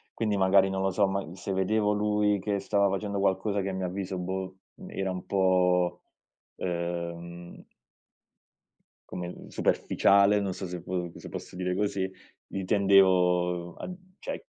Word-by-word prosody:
quindi 105 -2 0
magari, 95 0 +4
non 95 - -1
lo 95 - +2
so, 100 +2 +2
ma 95 -3 -3
se 95 - -4
vedevo 105 +3 +2
lui 105 0 +2
che 100 +1 -1
stava 100 0 +2
facendo 100 +1 -2
qualcosa 100 +1 +1
che, 100 - -2
a 95 - -3
mio 95 -1 -2
avviso, 95 +1 -4
boh, 95 +1 -4 0.2
uhm, - - -10
era 95 -1 -2
un 90 - -5
po', 90 -2 +2 0.5
ehm 85 0 -5 1.5
come, 90 -1 -5
mhmm, - - -10
superficiale, 100 +1 +3
non 100 -2 -2
so 95 +1 -5
se 90 -1 -6
po 90 -2 -3
se - - -9
posso - - -8
dire 90 0 -1
così, 95 -1 -1 0.4
lì 95 - -4
tendevo 90 -3 +3
a - - -7 0.3
cioè, - - -6
95 Hz, 155 wpm, -28 LUFS, 90-100 Hz, 1.5 s, magari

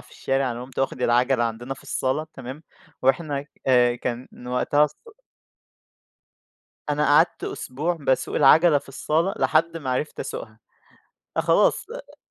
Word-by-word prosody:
في - - -19
الشارع، 135 -1 -1
أنا 120 +1 -6
قمت 130 +1 -11
واخد 135 -1 -1
العَجَلة 120 +1 +3
عندنا 120 +4 -4
في - - -17
الصالة 140 +4 -2
تمام، 135 +4 -8 0.4
وإحنا، 140 +1 +1 0.2
آآ، 125 -2 +4
كان 120 +1 -4 0.2
وقتها 145 +4 +2
الص 150 - -6 1.9
أنا 150 0 +1
قَعدْت 150 +4 +3
أسبوع 155 +7 -3
باسوق 135 -2 0
العَجَلة 150 +2 +6
في 140 - -19
الصالة، 160 +8 0
لحد 165 +1 +2
ما 135 -5 -4
عرفت 145 +4 -2
أَسُوقها، 110 0 -7 0.8
خلاص، - - +3
آآ - - -10
135 Hz, 135 wpm, -24 LUFS, 125-150 Hz, 1.9 s, العَجَلة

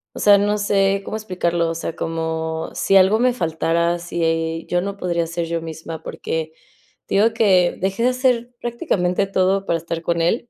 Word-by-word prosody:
o - - -6
sea, 205 -1 +6
no 205 +1 +1
sé 195 -1 +2
cómo - - -4
explicarlo, 175 -5 -1
o 165 - -3
sea, 165 0 -4
como 160 0 -3
si 195 - +3
algo 190 +3 +5
me 250 0 +3
faltara, 170 -2 0
si 165 -1 -1
yo 175 0 +1
no 200 +1 -4
podría 170 -3 -1
ser 170 0 -3
yo 165 0 -3
misma, 160 0 -7
porque 160 0 -4 0.5
te - - -3
digo 225 +2 +4
que 185 -6 +3
dejé 195 +4 -1
de 250 - +4
hacer 250 -2 +1
prácticamente 195 -5 0
todo 195 +1 +1
para 165 - +1
estar 165 0 -5
con 170 0 0
él, 225 +8 0
175 Hz, 190 wpm, -21 LUFS, 165-200 Hz, 0.5 s, sea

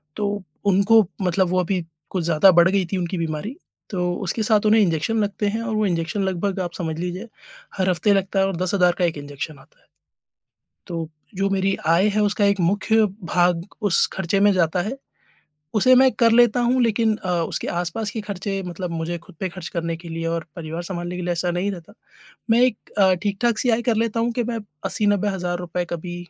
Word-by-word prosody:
तो 205 -2 -2 0.2
उनको 200 +2 +5 0.2
मतलब 185 0 +1
वो 185 - +1
अभी 180 0 0 0.3
कुछ 185 -3 -2
ज़्यादा 170 +3 +5
बढ़ 170 0 +5
गई 190 -1 +1
थी 190 - 0
उनकी 180 +1 -2
बीमारी। 165 - -3 0.3
तो, 180 -2 -1
उसके 210 +3 -2
साथ 215 -1 +2
उन्हें 215 +1 +5
इन्जेक्शन 175 +5 +1
लगते 205 +1 -2
हैं 230 - -2
और 230 -1 -3
वो 215 -1 +1
इन्जेक्शन 175 +3 -1
लगभग 190 +1 -1
आप 175 -2 -3
समझ 160 -3 -3
लीजिए, 180 +5 -4 0.5
हर 190 -1 +1
हफ्ते 185 +3 +2
लगता 195 0 0
है 195 - +4
और 195 - -3
10,000 185 +2 -1
हज़ार 180 -2 +4
का 175 - +3
एक 165 -3 -1
इन्जेक्शन 145 +1 -7
आता - - -22
है। - - -32 1.0
तो, 165 -2 -4 0.3
जो 195 +1 0
मेरी 195 0 +1
आय 170 +5 +4
है - - +3
उसका 205 0 +1
एक 200 -1 +2
मुख्य 205 +5 +2 0.3
भाग 175 -1 +2 0.2
उस 175 - +5
खर्चे 190 +1 -1
में 205 0 +5
जाता 175 -1 +1
है, 220 +8 -4 0.8
उसे 255 +5 +5
मैं 260 0 +6
कर 230 -1 +5
लेता 240 0 +5
हूँ 245 +1 +2
लेकिन 225 -1 +2
अ, 185 - -7 0.2
उसके - - -3
आस-पास 205 +5 -3
के 220 - -4
खर्चे 195 -1 -4
मतलब 175 0 -5
मुझे 170 +1 -3
ख़ुद 170 - -18
पे 190 - -1
खर्च 175 -1 -8
करने 165 0 -2
के 170 +1 -11
लिए 165 0 -4
और 165 0 -2
परिवार 165 +1 -5
सँभालने 175 0 -5
के 180 - -4
लिए 175 - -1
ऐसा 175 +1 -1
नहीं 180 +3 -1
रहता। 170 -3 -10 0.6
मैं 230 +2 +5
एक 250 -4 0
अ, 190 -2 +5
ठीक-ठाक 215 +3 0
सी 250 - +2
आय 230 +1 +1
कर 230 - +3
लेता 230 0 -2
हूँ 235 +1 0
कि 240 +1 -1
मैं 230 - -2 0.3
80-90,000 195 -4 0
रुपए 175 0 -3
कभी 175 +1 -5
190 Hz, 210 wpm, -22 LUFS, 175-210 Hz, 1.0 s, मैं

